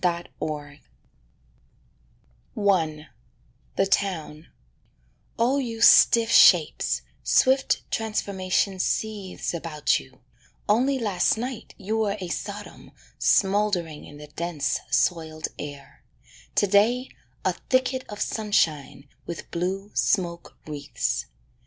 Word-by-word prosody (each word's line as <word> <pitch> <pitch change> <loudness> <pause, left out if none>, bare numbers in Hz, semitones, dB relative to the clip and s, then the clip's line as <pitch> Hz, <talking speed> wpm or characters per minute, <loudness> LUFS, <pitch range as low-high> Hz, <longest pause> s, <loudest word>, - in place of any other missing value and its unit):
TRANSFORMATIONS 155 -4 -3 1.7
I 165 -7 +1 0.7
=The 195 - +2
Town= 165 -5 -2 0.9
Oh 250 +5 +2
you 230 -4 -4
stiff 230 0 +6
shapes, 165 -5 +5 0.2
swift 265 +1 +3
transformation 195 -3 -1
seethes 205 -2 -2
About 160 -3 0
you: 130 0 -17 0.5
only 255 +6 +2
last 205 -5 +1
night 245 +1 -6
you 215 +3 -2
were 210 -1 0
A 180 -2 -5
Sodom 205 +3 -6 0.3
smouldering 190 -6 +1
in 145 - -12
the 150 - -10
dense, 155 +1 -2
soiled 160 -3 0
air; 145 -1 -9 0.5
To - - +4
day 220 +6 +3 0.4
a - - +2 0.2
thicket 255 0 +1
of 210 -1 -8
sunshine 155 -10 -1 0.2
with 170 - -7
blue 190 +4 -3
smoke 170 -3 -1
wreaths. 140 - -3
190 Hz, 100 wpm, -25 LUFS, 155-215 Hz, 1.7 s, stiff